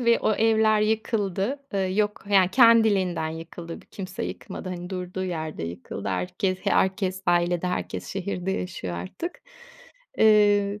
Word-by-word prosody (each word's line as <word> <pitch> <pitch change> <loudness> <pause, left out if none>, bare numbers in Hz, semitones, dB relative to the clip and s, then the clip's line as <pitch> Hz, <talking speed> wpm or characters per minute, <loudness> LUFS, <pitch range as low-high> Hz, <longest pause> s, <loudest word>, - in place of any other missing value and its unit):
ve 235 -1 +4
o - - +2
evler 220 -1 +3
yıkıldı. 215 +1 0
Iıı, 190 -2 0
yok, 210 0 0
yani 190 -2 +5
kendiliğinden 205 -8 +4
yıkıldı, 165 +1 -8
kimse 190 -1 -6
yıkmadı. - - -7
Hani, 180 0 -6
durduğu 185 0 -4
yerde 160 - -4
yıkıldı. 85 +4 -6
Herkes 95 - -1
herkes 190 -1 +1
ailede, 175 0 +2
herkes 180 - -3
şehirde 190 -1 -3
yaşıyor 175 - -4
artık. 90 - -6 0.8
Iıı, 205 -1 +4
190 Hz, 130 wpm, -25 LUFS, 175-210 Hz, 0.8 s, yani